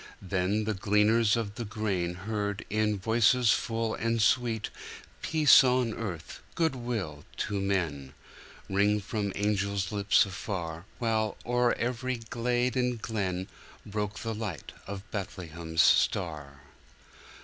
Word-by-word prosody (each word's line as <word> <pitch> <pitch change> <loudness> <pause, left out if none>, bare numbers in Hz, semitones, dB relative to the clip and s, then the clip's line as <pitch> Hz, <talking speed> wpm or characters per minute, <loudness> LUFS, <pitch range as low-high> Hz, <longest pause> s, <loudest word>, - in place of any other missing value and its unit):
Then 95 +2 0
the 110 0 -1
gleaners 105 +3 +3
of 105 -3 -3
the 120 - -5
grain 100 -6 -2
Heard, 105 +1 -3
in 105 0 +1
voices 115 +3 +3
full 115 -1 0
and 115 +1 0
sweet,"Peace 125 +6 +3
on 125 -3 +2
earth, 95 -9 -6
good 160 -4 +2
will 105 - -4
to 100 -2 -2
men," 80 -9 -2 0.5
Ring 100 +2 +2
from 105 -1 -3
angel 100 -1 0
lips 100 0 +4
afar, 90 -4 -5
While, 110 -3 0
o'er 120 0 +2
every 125 +2 -2
glade 120 +2 -1
and 125 -2 0
glen, 95 -5 -2 0.4
Broke 105 0 -3
the 115 -1 -3
light 105 -7 -5 0.2
of 100 -1 -6
Bethlehem's 85 -5 -1
star. 75 -7 +1
105 Hz, 120 wpm, -29 LUFS, 95-115 Hz, 0.5 s, lips